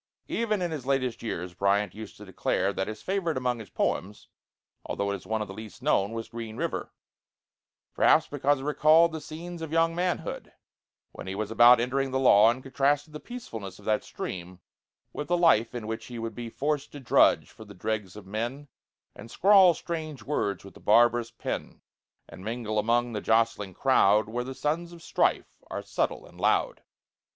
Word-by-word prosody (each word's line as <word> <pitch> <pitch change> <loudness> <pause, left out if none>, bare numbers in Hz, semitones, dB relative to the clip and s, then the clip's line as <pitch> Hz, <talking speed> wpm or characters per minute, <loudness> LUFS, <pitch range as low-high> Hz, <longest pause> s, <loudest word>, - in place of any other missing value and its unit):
Even 215 -5 0
in 175 - -2
his 140 -5 -5
latest 130 -3 0
years 90 -6 -4
Bryant 100 +1 +1
used 110 -1 -9
to 105 - -11
declare 95 +1 -1
that 95 - -2
his 110 0 -7
favorite 185 -6 -1
among 125 -2 -1
his 110 - -10
poems 100 +3 -2 0.5
although 100 0 -2
it - - -1
is 95 - -11
one 110 -1 -1
of - - -9
the 95 - -8
least 110 +3 -10
known 105 -8 +2
was 115 0 -5
'Green 115 -1 -7
River'; - - -3 1.0
perhaps 160 - +4
because 145 -1 0
it - - -7
recalled 155 +3 +5
the 160 -1 -6
scenes 165 +3 -8
of 160 -2 -5
young 165 0 +2
manhood, 180 +1 -3 0.6
when - - -9
he 95 - -4
was 110 +1 -3
about 120 +1 +7
entering 135 +3 0
the 130 - -1
law, 115 -5 +6
and 130 +2 -2
contrasted 145 +3 0
the 150 - -6
peacefulness 110 - -8
of 105 - -16
that 110 -1 +1
stream 90 0 -7 0.5
with 150 - -5
the 175 - +2
life 125 -9 +3
in 120 -3 -5
which 110 +1 -5
he 120 - -7
would 115 -1 -4
be 120 +1 -6
"Forced 145 +4 -2
to 145 - -7
drudge 130 - +3
for 110 - -12
the 100 -2 -13
dregs 100 +1 -3
of 105 -2 -10
men, 120 +8 -4 0.5
And 110 +3 -11
scrawl 190 - +6
strange 155 -8 -5
words 100 -9 -2
with 100 - -12
the - - -15
barbarous 120 +1 +4
pen, - - -6 0.5
And 95 - -12
mingle 110 -1 -2
among 120 +2 +1
the 105 - -3
jostling 110 -4 +1
crowd, 110 -6 +4
Where 120 +2 -2
the 130 +1 -7
sons 170 +5 -2
of 170 -1 -13
strife - - 0
are - - -5
subtle - - -2
and - - -15
loud." - - +1
120 Hz, 195 wpm, -27 LUFS, 105-150 Hz, 1.0 s, about